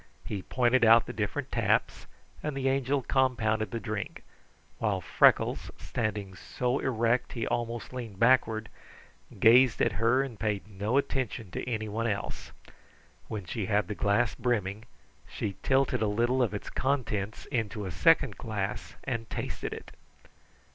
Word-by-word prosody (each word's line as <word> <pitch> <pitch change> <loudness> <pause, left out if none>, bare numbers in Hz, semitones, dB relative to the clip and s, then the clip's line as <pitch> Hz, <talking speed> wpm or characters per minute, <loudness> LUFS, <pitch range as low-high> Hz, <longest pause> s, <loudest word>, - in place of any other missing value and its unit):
He 100 -3 -4
pointed 125 +3 +2
out 115 0 +7
the - - -6
different - - -3
taps, - - 0 0.3
and 150 -2 -3
the 135 -1 0
Angel 135 0 0
compounded 110 -6 +1
the 115 - -3
drink, 105 0 -5 0.6
while - - 0
Freckles, - - +3
standing 105 - -3
so 125 +7 -2
erect 120 -1 0
he 115 -3 -2
almost 120 +1 -3
leaned 115 -6 -6
backward, 115 -1 +3 0.7
gazed 120 +1 +6
at - - +3
her 125 +4 +4
and 120 -7 -8
paid 105 -1 -1
no 105 +5 -1
attention 120 -8 -2
to 125 - -4
anyone 110 0 -2
else. 100 -2 -4 0.8
When 105 -4 -5
she 95 +3 -3
had 105 -3 +1
the 105 - -3
glass 100 0 +1
brimming, 110 -3 -1 0.4
she 100 -2 -4
tilted 135 -2 +2
a 110 - +2
little 120 +5 +1
of 115 -4 +1
its 105 - -6
contents 115 -7 -1
into 110 -4 -2
a 95 - -4
second 140 - +3
glass 105 -2 -4
and 115 -3 -3
tasted - - -4
it. - - -8
115 Hz, 145 wpm, -29 LUFS, 105-125 Hz, 0.8 s, out